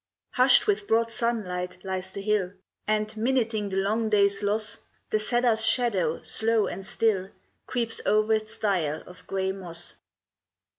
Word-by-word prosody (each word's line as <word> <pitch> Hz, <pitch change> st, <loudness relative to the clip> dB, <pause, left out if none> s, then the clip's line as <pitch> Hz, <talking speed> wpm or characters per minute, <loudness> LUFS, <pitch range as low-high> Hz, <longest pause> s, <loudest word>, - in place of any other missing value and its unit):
Hushed 255 Hz, 0 st, +5 dB
with 205 Hz, 0 st, 0 dB
broad 230 Hz, +1 st, +2 dB
sunlight 180 Hz, -7 st, -2 dB
lies 190 Hz, 0 st, -3 dB
the 200 Hz, +1 st, -6 dB
hill, 200 Hz, -3 st, 0 dB, 0.3 s
And, 215 Hz, 0 st, +1 dB
minuting 220 Hz, -2 st, -1 dB
the 190 Hz, -, -3 dB
long 215 Hz, +3 st, 0 dB
day's 200 Hz, -1 st, +3 dB
loss, 210 Hz, +1 st, -1 dB, 0.3 s
The 215 Hz, -, +2 dB
cedar's 235 Hz, 0 st, +2 dB
shadow, 200 Hz, -10 st, +2 dB
slow 220 Hz, +7 st, +3 dB
and 195 Hz, -, -5 dB
still, 195 Hz, -2 st, 0 dB, 0.4 s
Creeps 235 Hz, -2 st, 0 dB
o'er 215 Hz, +1 st, +3 dB
its 215 Hz, +1 st, -3 dB
dial 175 Hz, -8 st, -1 dB
of 180 Hz, 0 st, -15 dB
gray 190 Hz, 0 st, -1 dB
moss. 175 Hz, -3 st, -7 dB
210 Hz, 145 wpm, -26 LUFS, 190-225 Hz, 0.4 s, Hushed